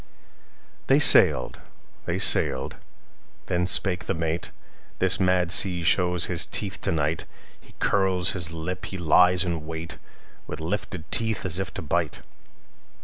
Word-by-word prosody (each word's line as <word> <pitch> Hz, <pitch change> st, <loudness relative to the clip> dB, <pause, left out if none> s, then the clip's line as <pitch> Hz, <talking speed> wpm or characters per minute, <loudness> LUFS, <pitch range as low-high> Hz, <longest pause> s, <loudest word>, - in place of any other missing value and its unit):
They 135 Hz, -, +4 dB
sailed. 75 Hz, -, +5 dB, 0.5 s
They -, -, -2 dB
sailed. 65 Hz, 0 st, +1 dB, 0.7 s
Then 90 Hz, 0 st, -1 dB
spake 95 Hz, -1 st, 0 dB
the 95 Hz, -, -2 dB
mate:"This 85 Hz, +3 st, -3 dB
mad 90 Hz, -2 st, +1 dB
sea 90 Hz, 0 st, +1 dB
shows 90 Hz, 0 st, +2 dB
his -, -, 0 dB
teeth -, -, -3 dB
to -, -, -1 dB
night. 80 Hz, 0 st, -1 dB, 0.3 s
He -, -, -21 dB
curls 95 Hz, -3 st, +2 dB
his 85 Hz, -4 st, -2 dB
lip, 85 Hz, +3 st, -5 dB
he 95 Hz, -, -6 dB
lies 90 Hz, +1 st, +4 dB
in 85 Hz, -3 st, -4 dB
wait, 80 Hz, +1 st, -7 dB, 0.5 s
With 75 Hz, -, -7 dB
lifted 90 Hz, 0 st, -5 dB
teeth, 110 Hz, -4 st, -2 dB
as 90 Hz, 0 st, -2 dB
if 95 Hz, -, -4 dB
to -, -, -5 dB
bite! 75 Hz, -, -2 dB
90 Hz, 140 wpm, -24 LUFS, 80-95 Hz, 0.7 s, sailed